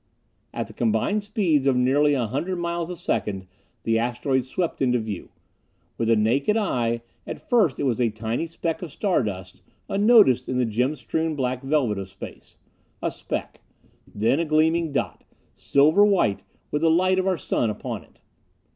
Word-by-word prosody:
At - - -3
the - - -14
combined 120 - +1
speeds 185 -9 +1
of 135 - +3
nearly 140 +4 +3
a 125 -3 0
hundred 145 - -2
miles 170 -1 -3
a 180 - -4
second 95 - -2 0.4
the 115 0 +1
asteroid 125 +2 0
swept 165 +5 -3
into 125 -2 +3
view. 110 -5 -5 0.7
With 115 - 0
the 115 - +5
naked 130 - +2
eye, 120 - 0 0.2
at - - -4
first 205 - +3
it - - -1
was 125 -3 0
a 120 - +3
tiny 110 +8 -3
speck 165 0 -3
of 175 -5 -6
star 185 +2 +1
dust, 95 -5 -6 0.3
unnoticed 200 - +4
in 130 - -1
the 125 - +2
gem 125 +6 0
strewn 160 +5 -2
black 130 -2 -2
velvet 135 -7 0
of 95 -1 -6
Space. 95 - -11 0.5
A - - 0
speck. - - -5 0.5
Then 115 +8 +1
a 170 - 0
gleaming 160 +1 +2
dot, 140 - -3 0.3
silver 155 +8 +4
white, 195 - +2 0.3
with 150 - -1
the 165 - +4
light 185 +3 +3
of 185 - 0
our 185 -2 +1
Sun 120 -5 0
upon 105 - -5
it. - - -26
135 Hz, 175 wpm, -24 LUFS, 115-170 Hz, 0.7 s, the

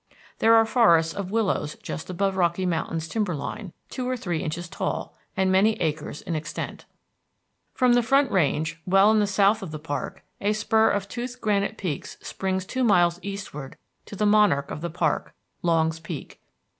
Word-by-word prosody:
There 225 0 +6
are 225 0 +6
forests 170 -8 +4
of 195 -2 -4
willows 200 -8 0
just 160 - -6
above 195 +2 0
Rocky 180 0 +1
Mountain's 165 -1 -2
timber 205 -3 -1
line, 175 +7 -6 0.2
two 255 -1 -4
or 255 - -1
three 175 -7 -2
inches 170 0 -4
tall, - - -4 0.2
and 190 0 +2
many 200 +4 +4
acres 155 -2 -3
in 175 - -4
extent. 155 +1 -5 0.9
From 250 -2 +4
the 245 - +5
Front 275 +4 +3
Range, 160 -2 0
well 195 +3 +5
in 220 - +4
the 205 - +2
south 200 +2 +3
of 190 - -6
the 155 - -5
park, 150 -1 -5 0.2
a 205 +1 +2
spur 220 +1 +3
of 200 -1 -1
toothed 245 +3 -6
granite 210 -1 0
peaks 165 -8 -4
springs 190 -1 -3
two 260 +6 -2
miles 175 -6 +4
eastward 190 -8 -7 0.3
to - - -8
the 210 - 0
monarch 205 -9 +3
of - - -5
the 170 - -3
park, 160 -2 -1 0.3
Longs 160 -1 +1
Peak. 165 -3 -8
190 Hz, 180 wpm, -25 LUFS, 165-215 Hz, 0.9 s, There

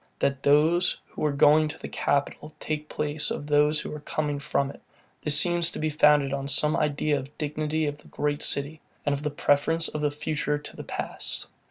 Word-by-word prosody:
That 135 -1 0
those 155 +5 +3
who - - -6
are 150 - +2
going 150 +2 +5
to 150 - -7
the - - -7
capital 145 +2 -1
take 150 0 -4
place 150 0 -2
of 145 - -4
those 150 +1 +3
who - - -6
are 150 - -6
coming 150 -1 -2
from 140 -1 -1
it; - - -15 0.4
this 150 0 +3
seems 175 0 +3
to - - -6
be 155 0 -1
founded 150 -2 +4
on 140 0 -3
some 150 +3 +4
idea 150 0 +1
of 135 +2 -11
dignity 155 +1 -1
of 145 0 -3
the - - -18
great 145 0 -2
city, 145 +2 -3 0.2
and 145 - +2
of 140 - -3
the 150 - -1
preference 150 +3 +1
of 150 - -4
the 150 - +2
future 150 0 -2
to 145 - -10
the - - -7
past. - - -5
150 Hz, 210 wpm, -26 LUFS, 145-155 Hz, 0.4 s, going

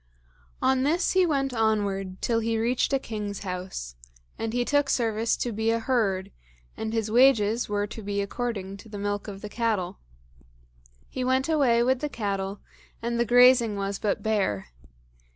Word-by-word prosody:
On 260 0 +3
this 330 +6 +1
he 370 -1 +4
went 275 -4 0
onward 200 -4 -1
till 230 -1 +2
he 225 0 0
reached 235 +5 +1
a 275 - +3
king's 210 -5 -5
house, 180 - -5 0.4
and 225 - -3
he 245 +1 0
took 285 0 +2
service 225 -1 +1
to 240 - -2
be 220 +1 -1
a 230 - +2
herd, 220 -6 0 0.4
and 220 0 -4
his 220 -1 -1
wages 235 -3 +4
were 205 0 0
to 215 +2 -8
be 200 0 -3
according 200 -2 -3
to 220 - -14
the 205 - -7
milk 205 +1 -3
of 195 -1 -7
the - - -4
cattle. 215 - -1 1.1
He 255 - -4
went 260 +2 +1
away 265 -7 +3
with 260 +1 +2
the 295 - -2
cattle, 200 -4 -3 0.4
and 235 0 -2
the 235 - +3
grazing 245 -2 +6
was 200 0 -3
but 205 - -1
bare. 195 - 0
225 Hz, 170 wpm, -26 LUFS, 205-245 Hz, 1.1 s, grazing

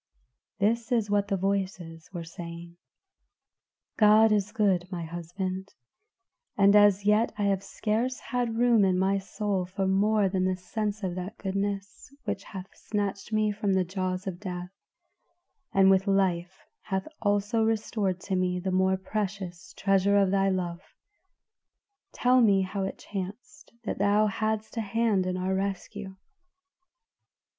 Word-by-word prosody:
This 225 +4 0
is 225 -4 +1
what 205 -1 +2
the 200 -1 0
voices 185 -4 -3
were 175 -3 -5
saying: 170 +1 -9 1.2
"God 215 +1 +6
is 210 -1 +1
good, 190 -4 +1
my 175 -2 -4
husband, 185 +3 -5 0.8
and 200 0 +6
as 205 -1 +5
yet 210 +2 +3
I 205 - -1
have 195 -1 +1
scarce 225 +6 -1
had 240 -3 -2
room 235 -3 +4
in 185 -1 +3
my 195 +1 +2
soul 195 -1 -2
for 190 +1 -2
more 200 +2 +3
than 185 -1 0
the 185 0 +1
sense 210 +3 -4
of 185 -2 -1
that 185 +4 -6
goodness 195 +1 -3
which 205 -3 -4
hath 190 -1 -9
snatched 205 -1 -3
me 215 -1 +2
from 205 -1 -1
the 190 -1 +3
jaws 185 0 -3
of 185 -3 -5
death, 180 -2 -6 1.0
and 195 0 +5
with 190 +1 +3
life 190 -2 0 0.2
hath 190 0 -3
also 205 +2 +1
restored 215 -4 0
to 195 - -2
me 180 -1 0
the 190 +1 -2
more 190 +1 +2
precious 190 -4 -4
treasure 195 +1 +3
of 195 -2 +3
thy 195 0 +3
love. 175 -2 -2 1.3
Tell 250 +1 +3
me 200 -4 +4
how 195 +1 -3
it 190 - -5
chanced 200 +3 -7
that 215 - -4
thou 205 +2 +4
hadst 220 +1 -2
a - - +1
hand 215 -3 +1
in 185 0 -1
our 185 +1 -1
rescue?" 195 0 -4
195 Hz, 150 wpm, -28 LUFS, 185-210 Hz, 1.3 s, God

